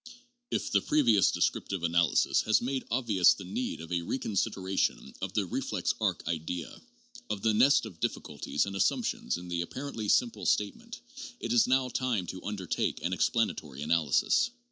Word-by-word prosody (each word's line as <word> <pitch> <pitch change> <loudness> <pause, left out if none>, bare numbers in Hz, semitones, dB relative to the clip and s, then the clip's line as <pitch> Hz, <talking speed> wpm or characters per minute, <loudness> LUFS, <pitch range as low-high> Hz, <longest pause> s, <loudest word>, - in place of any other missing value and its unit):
If - - -2
the 100 - +3
previous 115 -9 +4
descriptive 95 -4 -1
analysis 85 -2 +3
has 110 - +5
made 130 +2 -3
obvious 115 -8 +4
the 95 - -9
need 100 +1 -3
of 80 +1 -10
a 90 -1 0
reconsideration 95 - -1
of - - -4
the - - +1
reflex - - -1
arc - - -1
idea, 85 +1 -4 0.5
of 100 -2 -3
the 110 -1 +3
nest 125 +4 +5
of 90 -7 -10
difficulties 75 -1 -2
and 100 0 -6
assumptions 85 -7 0
in 90 0 -9
the 85 -1 -2
apparently 115 +2 -5
simple 115 -2 +2
statement, 230 - -1 0.4
it 115 - -2
is 120 - +5
now 130 0 +3
time 120 -8 -1
to 90 +1 -7
undertake 100 -4 -2
an - - -1
explanatory 70 -1 -1
analysis. 80 - +2
100 Hz, 160 wpm, -29 LUFS, 85-120 Hz, 0.5 s, has